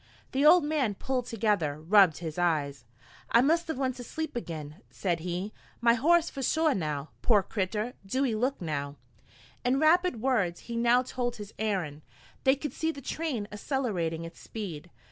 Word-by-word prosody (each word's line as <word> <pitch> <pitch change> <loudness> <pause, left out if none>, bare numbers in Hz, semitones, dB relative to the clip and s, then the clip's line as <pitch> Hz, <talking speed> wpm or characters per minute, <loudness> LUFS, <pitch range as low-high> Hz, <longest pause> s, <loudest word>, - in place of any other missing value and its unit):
The 270 +2 +1
old 330 +2 +7
man 290 -8 0
pulled 250 +2 -2
together, 205 -11 0
rubbed 180 0 +5
his 165 -1 -5
eyes. 145 -7 0 0.5
"I 235 - +6
must 325 +5 +2
of 320 - -2
went 260 -2 -1
to 245 - -7
sleep 315 +3 -5
agin," 155 -9 -5
said 175 -4 -1
he. 180 +5 -4 0.3
"My 235 0 +5
horse 330 +7 +3
pshaw 305 +3 +1
now, 150 -4 -3
pore 210 -5 +4
critter, 210 +5 -2
do 260 +8 0
ee 240 - 0
look 250 +5 0
now!" 145 -4 -3 0.7
In 255 +2 +2
rapid 330 -3 +3
words 215 -9 0
he 235 - -7
now 240 +2 +4
told 245 -1 -3
his 210 -1 -9
errand. 185 -9 -2 0.4
They 265 +1 +6
could 285 -1 -5
see 320 0 -1
the 280 - -9
train 275 -6 -3
accelerating 205 - -2
its 165 - -10
speed. 175 -7 -7
225 Hz, 170 wpm, -29 LUFS, 175-270 Hz, 0.7 s, old